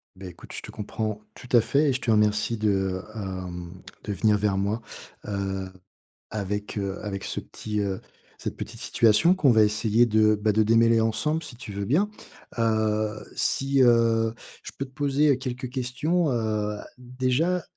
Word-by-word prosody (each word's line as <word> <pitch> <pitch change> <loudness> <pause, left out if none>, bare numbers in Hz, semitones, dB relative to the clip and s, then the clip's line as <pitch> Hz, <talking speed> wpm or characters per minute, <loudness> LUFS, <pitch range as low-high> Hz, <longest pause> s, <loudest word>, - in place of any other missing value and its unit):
Beh, 95 0 -9
écoute, 85 - -13
je - - -5
te - - -9
comprends, 110 0 -4
tout 125 - -13
à - - +8
fait 140 +6 +2
et - - +2
je 130 - -1
te 125 - -3
remercie 105 +1 +2
de, 95 -3 0
hem, 90 -4 -6 0.3
de 105 - -2
venir 105 +2 +3
vers 100 -1 0
moi. 105 +4 -1 0.5
Heu, 95 -2 -3 0.6
avec, 105 0 -4
heu, 100 -1 -3
avec 100 -2 -4
ce - - -4
petit, 105 -1 -5
heu, 95 -2 -2 0.4
cette - - -5
petite 115 +1 -6
situation 120 - +4
qu'on 140 -9 +4
va 110 -1 +5
essayer 105 +2 +3
de, 110 -2 +4
bah, 105 +1 0
de 110 +1 +3
démêler 115 +1 +4
ensemble 150 +9 0
si 145 - -9
tu 115 - -9
veux 100 0 -3
bien. 185 - +2 0.5
Heu, 110 -1 0
si, 135 0 +2
heu, 115 -1 +3 0.3
je - - -7
peux 135 - -3
te 130 - -14
poser 140 0 +2
quelques 125 -1 -5
questions? 140 +7 0
Heu, 110 -2 -1 0.2
déjà, 130 +8 0
110 Hz, 170 wpm, -26 LUFS, 105-125 Hz, 0.6 s, à